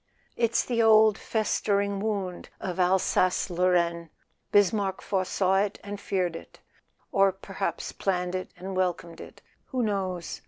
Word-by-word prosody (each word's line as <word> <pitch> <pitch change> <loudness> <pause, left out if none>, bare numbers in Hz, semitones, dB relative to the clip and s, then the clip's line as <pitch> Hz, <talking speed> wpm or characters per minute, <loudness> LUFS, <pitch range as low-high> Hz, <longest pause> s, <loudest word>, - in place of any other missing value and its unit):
"It's 235 -1 +1
the 235 -2 +1
old 220 -1 +6
festering 200 -2 0
wound 195 -4 -3
of 185 0 -4
Alsace 185 0 +2
Lorraine: 170 -1 +1 0.4
Bismarck 200 -1 +2
foresaw 190 0 0
it 200 +1 0
and 205 0 -6
feared 180 -4 -1
it—or 195 +3 -3
perhaps 190 - -4
planned 180 -2 -1
it 185 0 -3
and 190 +2 -6
welcomed 175 -2 -2
it: - - -13 0.2
who 255 -3 -2
knows? 190 -5 -2
190 Hz, 125 wpm, -27 LUFS, 180-205 Hz, 0.4 s, old